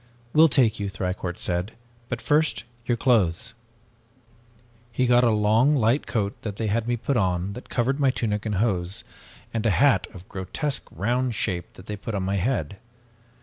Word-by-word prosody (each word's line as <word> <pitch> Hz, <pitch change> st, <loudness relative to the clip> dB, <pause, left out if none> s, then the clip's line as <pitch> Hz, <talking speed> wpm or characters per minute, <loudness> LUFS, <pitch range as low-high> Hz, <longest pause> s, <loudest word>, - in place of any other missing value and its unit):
"'We'll 160 Hz, +2 st, +7 dB
take 125 Hz, -6 st, +3 dB
you,' 100 Hz, -1 st, -2 dB
Thicourt 90 Hz, -2 st, -3 dB
said, 90 Hz, +4 st, -2 dB, 0.4 s
'but 115 Hz, -3 st, -4 dB
first 150 Hz, -4 st, +2 dB, 0.2 s
your 120 Hz, -, +1 dB
clothes 105 Hz, -10 st, +2 dB, 0.7 s
' 115 Hz, 0 st, -31 dB, 0.3 s
"He 125 Hz, +2 st, +1 dB
got 120 Hz, 0 st, +5 dB
a 120 Hz, -, +5 dB
long 110 Hz, +6 st, +3 dB
light 120 Hz, +2 st, +2 dB
coat 105 Hz, -4 st, -1 dB
that 105 Hz, -3 st, -4 dB
they 110 Hz, -, -3 dB
had 110 Hz, +2 st, 0 dB
me 120 Hz, 0 st, +1 dB
put 130 Hz, +3 st, -1 dB
on, 95 Hz, -1 st, 0 dB
that 125 Hz, -, -10 dB
covered 135 Hz, +4 st, 0 dB
my 140 Hz, -2 st, +4 dB
tunic 105 Hz, -5 st, -1 dB
and 105 Hz, -, -1 dB
hose, 95 Hz, -2 st, 0 dB, 0.5 s
and 115 Hz, -2 st, -1 dB
a 115 Hz, -, +3 dB
hat 110 Hz, -2 st, +3 dB
of 95 Hz, 0 st, -12 dB
grotesque 125 Hz, -, -3 dB
round 120 Hz, +6 st, -1 dB
shape 90 Hz, -5 st, -2 dB
that 90 Hz, -, -13 dB
they 105 Hz, -, -4 dB
put 105 Hz, +2 st, -5 dB
on 95 Hz, -, -1 dB
my 100 Hz, +1 st, 0 dB
head. 105 Hz, -1 st, -1 dB
110 Hz, 185 wpm, -25 LUFS, 95-125 Hz, 0.7 s, We'll